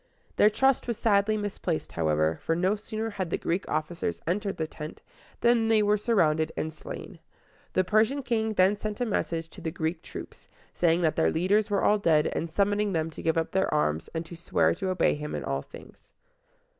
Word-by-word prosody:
Their 210 - +6
trust 265 +5 +2
was 235 -3 -2
sadly 215 0 +2
misplaced, 195 -5 -3
however; 80 -1 +1
for 165 - 0
no 185 +4 +2
sooner 220 +1 -4
had 190 -4 -3
the - - 0
Greek 175 +4 -2
officers 155 - -2
entered 195 +3 -1
the 160 - -1
tent 155 0 -8 0.4
than 235 -1 +4
they 220 -1 +4
were 210 0 +3
surrounded 165 -8 +2
and 160 0 -2
slain. 155 - -9 0.5
The 185 - +3
Persian 215 +9 +2
king 220 -3 0
then 190 +2 +4
sent 210 0 -5
a 245 - +1
message 165 -6 -2
to - - -12
the 160 - -2
Greek 160 0 -3
troops, - - -10 0.2
saying 170 0 +2
that 160 -2 +1
their - - +3
leaders 200 +6 +2
were 200 -2 +1
all 210 0 +4
dead, 160 -6 +3
and 165 - -2
summoning 205 +3 +1
them 160 -1 -1
to - - -9
give 160 0 +1
up 165 - 0
their 190 0 +1
arms 80 - 0
and 165 +1 -2
to 170 - -9
swear 170 - +1
to 190 -2 -3
obey 185 -2 +2
him 150 0 -5
in - - -4
all - - -2
things. - - -15
185 Hz, 205 wpm, -27 LUFS, 160-210 Hz, 0.5 s, Their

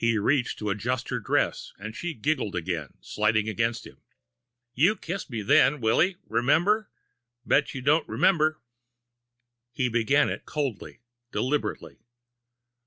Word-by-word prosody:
He 115 -1 +3
reached 125 +4 +1
to 105 -1 -2
adjust 120 +5 -2
her - - -1
dress, - - -1
and 110 +3 -8
she 175 +3 -4
giggled 120 -5 -1
again, 85 -5 -4
sliding 110 0 0
against 115 +1 -1
him. - - -14 0.7
"You 170 - +3
kissed 180 -2 -6
me 115 -5 -4
then, 135 +8 +4
Willy. 150 +11 +2
Remember? 165 - +2 0.6
Bet 145 +2 +2
you 130 - -5
don' 150 +4 +3
remember!" 155 -4 +2 1.1
He 125 +1 0
began 120 +5 +3
it - - -4
coldly, 135 -7 -4 0.3
deliberately. 145 +3 -2
125 Hz, 130 wpm, -26 LUFS, 110-150 Hz, 1.1 s, then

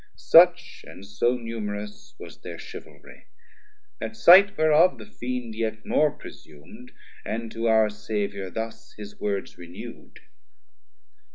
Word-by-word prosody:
Such 175 +1 +4
and 95 - -12
so 120 +5 0
numerous 105 -3 -7
was - - -12
thir - - -9
Chivalrie; - - -13 0.8
At 225 - -5
sight 200 +1 +7
whereof 155 +3 +4
the - - -11
Fiend 125 - -6
yet 110 0 -4
more 155 - +2
presum'd, 85 - -14 0.3
And 115 0 -5
to 115 +1 -3
our 110 -1 +4
Saviour 100 -2 -4
thus 110 +4 -7
his 105 -1 -11
words 100 -3 -4
renew'd. 85 0 -11
110 Hz, 120 wpm, -25 LUFS, 105-125 Hz, 0.8 s, sight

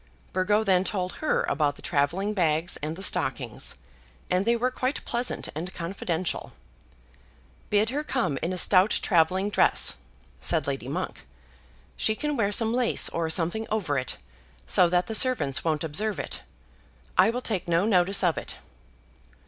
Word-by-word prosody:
Burgo 205 +4 +2
then 190 -3 +3
told 185 -2 -1
her 310 - +1
about 145 -1 0
the - - -14
travelling 175 +9 0
bags 165 -2 +1
and 155 +2 -4
the 190 - -8
stockings, 130 - +1 0.6
and 180 +2 +2
they 235 +1 +3
were 250 +2 0
quite 255 +2 -2
pleasant 240 +1 -2
and 170 +5 -6
confidential. 170 0 -3 1.2
"Bid 210 +2 +2
her 290 +3 -2
come 180 - -1
in 170 - -1
a 185 - -3
stout 185 +2 +4
travelling 185 +3 +2
dress," - - +3 0.4
said - - +1
Lady - - -3
Monk. - - -4 0.7
"She 220 - +1
can 295 +5 -2
wear 205 -5 +1
some 225 +2 +3
lace 245 -1 +3
or 165 -1 -2
something 175 +7 0
over 195 -10 -1
it, 130 -2 -2 0.5
so 60 - +3
that 180 +1 +2
the 225 - -5
servants 215 - +2
won't 155 -2 0
observe 195 +4 -1
it. - - -5 0.7
I 185 +4 +5
will 245 +2 -2
take 205 -7 -2
no 170 +3 +2
notice 195 -2 +3
of 170 -5 +2
it." - - -6
185 Hz, 160 wpm, -26 LUFS, 165-220 Hz, 1.2 s, I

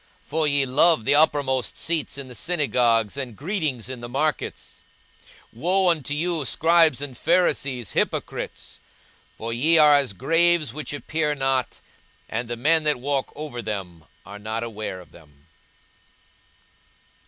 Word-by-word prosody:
for 155 0 -1
ye 140 -1 +2
love 140 0 +3
the 140 - +3
uppermost 145 -4 +2
seats 160 -4 -2
in 140 -2 -6
the 125 - -10
synagogues, 120 - +1
and 130 -5 -5
greetings 150 - -3
in 130 -2 -7
the 120 - -7
markets. 145 +4 -3 0.7
42:011:044 115 - -15
Woe 185 +2 +3
unto 150 -5 0
you, 165 0 0
scribes 160 0 +3
and 135 -3 -6
Pharisees, 130 - 0
hypocrites! - - -3 0.6
for 115 +1 -4
ye 155 +8 +3
are 150 -2 +7
as 140 -7 +1
graves 165 - +2
which 150 +1 -5
appear 150 +1 -2
not, 135 -2 -1 0.5
and 115 +2 -3
the 120 0 -4
men 160 +6 +3
that 150 -2 +2
walk 140 +1 -2
over 145 -5 -6
them 95 -7 -6 0.2
are 100 0 -10
not 110 +2 -4
aware 110 -4 -5
of 90 - -18
them. 75 -3 -19
140 Hz, 145 wpm, -24 LUFS, 120-155 Hz, 0.7 s, are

